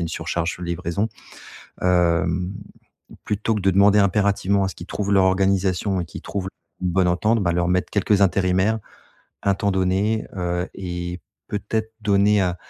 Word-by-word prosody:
a - - -1
une 85 - -2
surcharge 85 +1 -2
sur 90 - -7
livraison. 85 +5 -2 0.7
Hem, 90 0 +2 0.7
plutôt 105 +2 -1
que - - -2
de 95 +1 +3
demander 100 +2 +5
impérativement 100 0 +2
à 95 - 0
ce - - -9
qu'ils 85 - -9
trouvent 100 -1 -3
leur 95 -1 +5
organisation 95 0 +1
et - - -2
qu'ils 80 - -10
trouvent 95 -2 -4 0.4
une 90 - +1
bonne 90 0 +2
entente, 110 +6 +2
bah, 85 - +1
leur 85 0 +1
mettre 90 0 0
quelques 100 0 +2
intérimaires, 95 +3 +2 0.6
un 100 - +2
temps 100 +1 0
donné, 95 +4 0
heu 90 0 -1
et 90 -2 -5 0.3
peut-être 110 +2 -3
donner 105 0 +3
à 90 -2 0
95 Hz, 170 wpm, -22 LUFS, 90-100 Hz, 0.7 s, demander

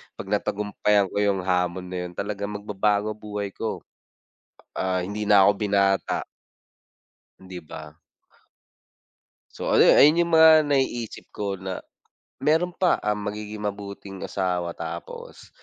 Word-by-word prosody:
'pag 95 - -8
napagtagumpayan 105 -1 0
ko - - -6
'yong 100 -2 +1
hamon 90 0 -1
na 90 - -5
'yon, 90 - -9
talagang 100 +2 -4
magbabago 105 +1 0
buhay 105 -1 -5
ko. 110 +3 -5 1.0
Ah, 95 -1 0
hindi 105 +3 -4
na 105 -1 +6
ako 100 +2 +6
binata. 100 -2 +1 1.2
'Di 95 -1 -9
ba? 80 -2 -10 1.6
So, - - -4
ano - - +5
'yon, - - +7
ayon 155 +4 +6
'yong 170 -1 +2
mga 160 0 +8
naiisip 130 -5 -2
ko 100 -1 -3
na 95 -1 -5 0.6
meron 160 +5 +2
pa, 180 -2 +2
um, 105 -1 -2
magiging 105 0 -5
mabuting 100 -1 -6
asawa, 90 -2 -2
tapos 85 +1 -8
100 Hz, 130 wpm, -24 LUFS, 95-105 Hz, 1.6 s, mga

